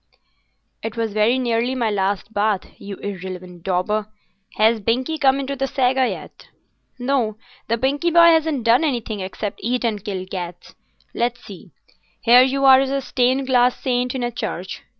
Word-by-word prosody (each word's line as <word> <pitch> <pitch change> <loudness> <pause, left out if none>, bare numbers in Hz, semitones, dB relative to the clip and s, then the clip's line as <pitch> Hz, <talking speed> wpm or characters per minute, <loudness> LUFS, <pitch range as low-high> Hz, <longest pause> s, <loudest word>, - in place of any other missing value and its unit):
"It 225 0 -6
was 225 -2 -2
very 215 +4 +3
nearly 240 0 0
my 235 -4 0
last 200 +1 -2
bath, 205 -2 +1 0.2
you 200 0 -7
irreverent 185 -3 -7
dauber. 195 +4 -1 0.5
Has 220 +1 +3
Binkie 255 +9 -1
come 270 -1 +3
into 275 0 -3
the 270 0 -2
Saga 260 -1 +1
yet?" - - -9 0.5
"No; 245 -4 -1 0.3
the 230 - 0
Binkie 280 +7 0
boy 335 0 +7
hasn't 320 -5 +1
done 235 +6 +4
anything 235 -8 -2
except 195 +2 -5
eat 245 +3 -1
and 210 -4 -2
kill 190 -4 -4
cats. 180 -2 -7 0.4
Let's 240 +1 -2
see. 195 -3 -11 0.5
Here 245 +2 +7
you 270 +1 +2
are 265 -1 +8
as 270 0 0
a 275 0 0
stained 260 0 0
glass 250 -1 +2
saint 250 0 -1
in 255 - -2
a 240 - -1
church. 240 - -5
240 Hz, 170 wpm, -21 LUFS, 210-265 Hz, 0.5 s, are